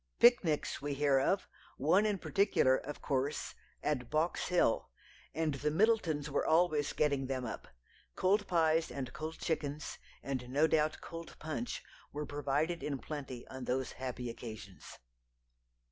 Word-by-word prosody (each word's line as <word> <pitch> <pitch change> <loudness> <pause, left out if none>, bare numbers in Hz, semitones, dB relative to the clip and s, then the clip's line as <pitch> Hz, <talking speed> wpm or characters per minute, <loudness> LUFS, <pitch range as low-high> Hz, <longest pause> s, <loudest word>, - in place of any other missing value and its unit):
Picnics 215 - +4
we 145 0 -2
hear 140 -1 +4
of 190 +8 +1 0.3
one 180 +10 +4
in 205 -2 +1
particular, 185 -9 +3
of 145 +2 -6
course, 140 +1 -1 0.3
at 130 -5 -1
Box 160 +3 0
Hill 180 -10 +2 0.5
and 160 -2 +1
the 140 +2 0
Middletons 165 -5 +2
were 145 - 0
always 155 -3 +3
getting 140 -3 +1
them 130 -2 -2
up. 110 - -6 0.5
Cold 205 +2 +2
pies 165 -2 +3
and 130 -3 -5
cold 160 +1 -5
chickens, 150 -2 -3 0.2
and 130 -2 -3
no 145 +4 +4
doubt 155 -1 +2
cold 165 -1 -8
punch, 160 +10 -4 0.3
were 150 +1 -3
provided 145 +4 -1
in 145 -2 -2
plenty 135 -4 -6
on 130 -1 -7
those 130 +1 -1
happy 125 -1 -4
occasions. 110 -5 -9
150 Hz, 145 wpm, -34 LUFS, 135-165 Hz, 0.5 s, Picnics